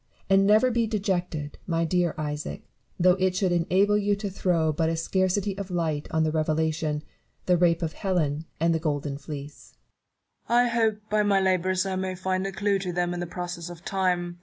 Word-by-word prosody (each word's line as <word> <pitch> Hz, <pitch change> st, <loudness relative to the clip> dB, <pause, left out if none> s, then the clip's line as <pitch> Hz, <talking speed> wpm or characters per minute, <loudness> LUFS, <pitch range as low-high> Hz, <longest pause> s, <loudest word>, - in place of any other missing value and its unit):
And 195 Hz, 0 st, +5 dB
never 220 Hz, +5 st, +5 dB
be 230 Hz, -1 st, +1 dB
dejected, 180 Hz, -8 st, -2 dB
my 165 Hz, -1 st, +1 dB
dear 175 Hz, 0 st, +1 dB
Isaac, 150 Hz, -1 st, -4 dB, 0.4 s
though 180 Hz, +1 st, +6 dB
it 185 Hz, -1 st, +1 dB
should 185 Hz, -1 st, +1 dB
enable 190 Hz, +4 st, +3 dB
you 205 Hz, 0 st, +1 dB
to 200 Hz, -1 st, -5 dB
throw 170 Hz, -4 st, +1 dB
but 160 Hz, +2 st, +1 dB
a 165 Hz, -, 0 dB
scarcity 185 Hz, +4 st, 0 dB
of 200 Hz, -1 st, -5 dB
light 160 Hz, -4 st, -1 dB
on 160 Hz, 0 st, +1 dB
the 155 Hz, -, +1 dB
Revelation, 155 Hz, -1 st, 0 dB, 0.4 s
The 180 Hz, -, +4 dB
Rape 170 Hz, -1 st, +2 dB
of 160 Hz, -1 st, -2 dB
Helen, 160 Hz, -5 st, -1 dB
and 165 Hz, +1 st, +3 dB
The 160 Hz, -, 0 dB
Golden 145 Hz, -3 st, -2 dB
Fleece. 145 Hz, 0 st, -9 dB, 0.7 s
Newton. 240 Hz, +1 st, +5 dB
I -, -, 0 dB
hope 225 Hz, -2 st, +2 dB
by 215 Hz, 0 st, +3 dB
my 205 Hz, -2 st, +3 dB
labours 185 Hz, 0 st, +1 dB
I 190 Hz, -1 st, -2 dB
may 185 Hz, 0 st, -2 dB
find 185 Hz, +1 st, -1 dB
a -, -, -4 dB
clew 200 Hz, +1 st, 0 dB
to 185 Hz, -1 st, -3 dB
them 175 Hz, 0 st, -1 dB
in 175 Hz, -, -4 dB
the 175 Hz, -, -3 dB
process 175 Hz, -1 st, -5 dB
of 175 Hz, +1 st, -11 dB
time. 180 Hz, -3 st, -1 dB
180 Hz, 200 wpm, -26 LUFS, 160-195 Hz, 0.7 s, though